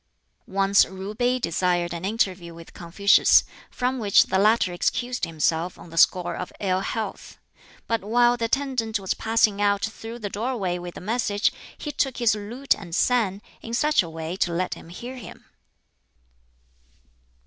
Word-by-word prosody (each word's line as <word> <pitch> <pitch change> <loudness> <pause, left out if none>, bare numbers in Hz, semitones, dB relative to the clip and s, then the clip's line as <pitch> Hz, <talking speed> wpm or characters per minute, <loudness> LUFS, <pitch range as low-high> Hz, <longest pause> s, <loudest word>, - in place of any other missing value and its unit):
Once 195 +1 +3
Ju 190 +2 -7
Pi 245 +3 +1
desired 175 -4 0
an 170 0 -6
interview 185 -5 -1
with 165 0 -13
Confucius, 190 +4 +4 0.3
from 255 +1 -2
which 205 -3 +5
the 190 - 0
latter 210 -3 +3
excused 245 +7 -1
himself 165 +2 -1
on 170 - -13
the - - -10
score 175 +1 +3
of 180 - -6
ill 185 -2 0
health; 215 +3 -5 0.5
but 230 -1 -1
while 240 +3 +3
the 235 -1 -2
attendant 235 -4 -1
was 190 -1 -1
passing 220 -2 +1
out 200 -1 +2
through 225 +1 -8
the 215 -3 -5
doorway 205 -4 -2
with 175 0 -8
the - - -8
message 210 0 0 0.3
he 295 - -5
took 270 -3 -1
his 235 -3 +3
lute 230 +6 -1
and 175 -5 -7
sang, 210 -4 +1 0.2
in 230 +1 -4
such 300 +1 +3
a 170 - -6
way 160 0 -6
as 185 - -6
to 175 - +1
let 180 +2 -1
him - - -12
hear 245 +9 -8
him. 235 - -11
205 Hz, 170 wpm, -24 LUFS, 180-235 Hz, 0.5 s, which